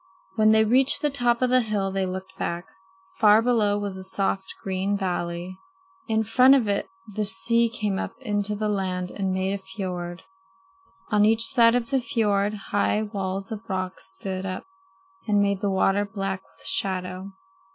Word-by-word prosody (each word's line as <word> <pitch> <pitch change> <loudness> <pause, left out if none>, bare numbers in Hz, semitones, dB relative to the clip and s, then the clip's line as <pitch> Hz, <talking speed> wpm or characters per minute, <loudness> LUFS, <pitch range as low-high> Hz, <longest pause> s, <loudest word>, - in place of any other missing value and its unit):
When 215 0 +4
they 220 0 +5
reached 260 +6 +4
the 295 - +2
top 245 -2 +1
of 250 - +2
the 255 0 +5
hill 205 -4 -1
they 190 -1 -1
looked 190 +1 -6
back. 175 -1 -3 0.5
Far 210 0 +7
below 225 -4 +2
was 200 -2 -4
a 190 - -8
soft, 190 0 -1
green 195 +1 -1
valley. 180 -1 -3 0.5
In 220 -1 +1
front 250 +5 +6
of 245 -6 +1
it 200 -1 0 0.2
the 210 0 -3
sea 230 +4 +2
came 210 -4 -2
up - - -4
into 210 -4 -1
the 215 +1 -2
land 185 -3 -2
and 195 -2 -2
made 190 +1 -1
a 200 - -4
fiord. 185 -3 -6 0.9
On 210 -1 +4
each 225 +2 +4
side 230 -1 +5
of 235 -2 -1
the 270 -1 +2
fiord 210 -5 0 0.2
high 210 +1 +1
walls 195 -2 -4
of 220 +1 -7
rock 185 -1 -3
stood 185 - -6
up 185 -1 -4 0.6
and 205 -1 +3
made 200 -1 +1
the 205 - 0
water 195 +1 +2
black 195 -2 -4 0.2
with - - -14
shadow. 185 0 -2
200 Hz, 175 wpm, -25 LUFS, 190-220 Hz, 0.9 s, Far